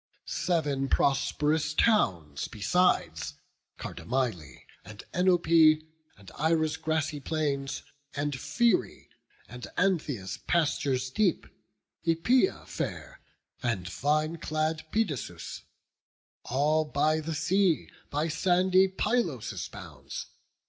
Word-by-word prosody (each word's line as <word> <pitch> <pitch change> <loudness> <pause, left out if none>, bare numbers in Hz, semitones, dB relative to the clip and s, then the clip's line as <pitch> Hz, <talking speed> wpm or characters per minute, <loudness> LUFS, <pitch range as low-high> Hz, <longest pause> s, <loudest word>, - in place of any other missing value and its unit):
Sev'n 145 -6 0
prosp'rous 150 +2 +1
towns 85 - +2
besides; 180 - +1 0.4
Cardamyle, 115 - -3 0.2
And 105 -1 -11
Enope, 180 -1 +3 0.7
and 100 -1 -14
Ira's 160 0 +2
grassy 155 -2 -1
plains, 140 -2 -2 0.3
And 145 +1 -1
Pherae, 180 - 0 0.4
and 125 0 -8
Antheia's 145 - 0
pastures 140 -6 +1
deep, 190 +1 +1 0.6
Æpeia 175 - +2
fair, - - -5 0.4
and 115 -8 -1
vine 150 - 0
clad 155 0 -2
Pedasus; 145 - -2 0.8
All 150 +5 +2
by 155 +1 +1
the 160 +1 -4
sea, 175 +2 +2 0.2
by 150 +3 0
sandy 185 +3 +3
Pylos' 190 - -1
bounds. - - -8
155 Hz, 90 wpm, -29 LUFS, 130-170 Hz, 0.8 s, Enope